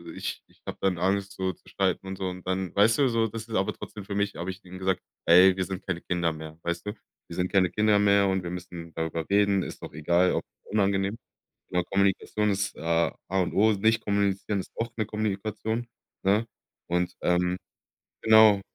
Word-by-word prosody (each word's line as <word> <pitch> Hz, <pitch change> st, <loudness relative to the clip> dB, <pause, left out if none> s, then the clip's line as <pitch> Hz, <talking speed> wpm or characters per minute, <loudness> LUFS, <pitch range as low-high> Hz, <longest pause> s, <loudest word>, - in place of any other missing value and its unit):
ich -, -, -5 dB
ich -, -, -28 dB
habe -, -, -5 dB
dann 95 Hz, -2 st, +1 dB
Angst, 95 Hz, +3 st, 0 dB
so 95 Hz, 0 st, -1 dB
zu 90 Hz, -, -20 dB
streiten 95 Hz, 0 st, -1 dB
und 95 Hz, -, -5 dB
so.“ 95 Hz, -1 st, -2 dB
Und 90 Hz, 0 st, -9 dB
dann 95 Hz, -1 st, -1 dB
weißt 110 Hz, +4 st, +4 dB
du, 135 Hz, -2 st, +4 dB
so? 115 Hz, -1 st, +2 dB
Das 115 Hz, +1 st, -7 dB
ist 110 Hz, -, -3 dB
aber 95 Hz, -, +1 dB
trotzdem 100 Hz, -2 st, -9 dB
für 100 Hz, -, -5 dB
mich 100 Hz, 0 st, 0 dB
habe 85 Hz, +3 st, -4 dB
ich 95 Hz, +1 st, -7 dB
ihm 95 Hz, 0 st, -10 dB
gesagt: 95 Hz, -1 st, 0 dB, 0.3 s
„Hey, 90 Hz, +2 st, +7 dB
wir 95 Hz, -, 0 dB
sind 95 Hz, 0 st, -6 dB
keine 95 Hz, -3 st, -2 dB
Kinder 85 Hz, -2 st, 0 dB
mehr“, 80 Hz, 0 st, -9 dB
weißt 85 Hz, +2 st, -3 dB
du? 105 Hz, -, -2 dB, 0.3 s
Wir 85 Hz, -, -8 dB
sind 90 Hz, +1 st, -1 dB
keine 95 Hz, -2 st, +4 dB
Kinder 105 Hz, +2 st, +3 dB
mehr 100 Hz, -1 st, +4 dB
und 95 Hz, 0 st, +1 dB
wir 85 Hz, -, -4 dB
müssen 85 Hz, -1 st, -7 dB
darüber 80 Hz, 0 st, -2 dB
reden, 100 Hz, -1 st, +3 dB
ist -, -, -7 dB
doch -, -, -8 dB
egal, 85 Hz, +4 st, +2 dB
auch -, -, 0 dB, 0.2 s
unangenehm. 100 Hz, -1 st, +1 dB, 0.6 s
Aber 90 Hz, 0 st, +2 dB
Kommunikation 100 Hz, +2 st, +1 dB
ist 100 Hz, 0 st, -1 dB
A 85 Hz, +1 st, +1 dB
A 95 Hz, +1 st, +1 dB
und 90 Hz, -, 0 dB
O, 110 Hz, +2 st, +4 dB
nicht 110 Hz, +3 st, +2 dB
kommunizieren 100 Hz, 0 st, 0 dB
ist -, -, -9 dB
auch 115 Hz, 0 st, -2 dB
eine 110 Hz, -, 0 dB
Kommunikation, 110 Hz, +2 st, -2 dB, 0.4 s
ne?“ 105 Hz, +4 st, +2 dB, 0.4 s
Und, 90 Hz, 0 st, 0 dB
ähm, 90 Hz, +1 st, +1 dB, 0.6 s
genau, 110 Hz, -2 st, +7 dB
95 Hz, 210 wpm, -27 LUFS, 90-105 Hz, 0.6 s, Hey